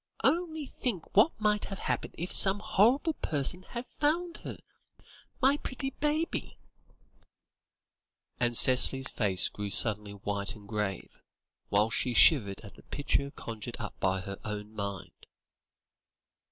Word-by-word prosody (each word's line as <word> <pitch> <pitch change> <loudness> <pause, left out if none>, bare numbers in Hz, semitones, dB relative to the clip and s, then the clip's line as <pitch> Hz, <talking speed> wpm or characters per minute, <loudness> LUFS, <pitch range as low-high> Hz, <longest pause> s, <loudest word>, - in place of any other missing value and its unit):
Only 320 -3 0
think 230 -9 -5
what 220 +9 +4
might 210 -1 +1
have 195 - -6
happened - - -3
if 175 +3 -4
some 195 +1 +5
horrible 235 - +2
person 155 - -2
had 240 +6 -7
found 335 +6 -1
her. - - -8 0.9
My 275 +2 +4
pretty 270 -1 -4
baby," 300 +4 -2 1.8
and 120 -2 +2
Cicely's 130 +1 +6
face 95 -5 +1
grew 105 0 -6
suddenly 105 -1 0
white 100 +1 -2
and 105 -2 -14
grave, 105 -3 -4 0.5
whilst 105 +2 +2
she 125 -2 0
shivered 105 -8 +4
at 100 -3 -12
the - - -17
picture 140 -1 -2
conjured 115 -6 -8
up - - -6
by 95 0 0
her 100 +1 -7
own 105 0 -6
mind. 100 -3 -7
135 Hz, 130 wpm, -29 LUFS, -, 1.8 s, Cicely's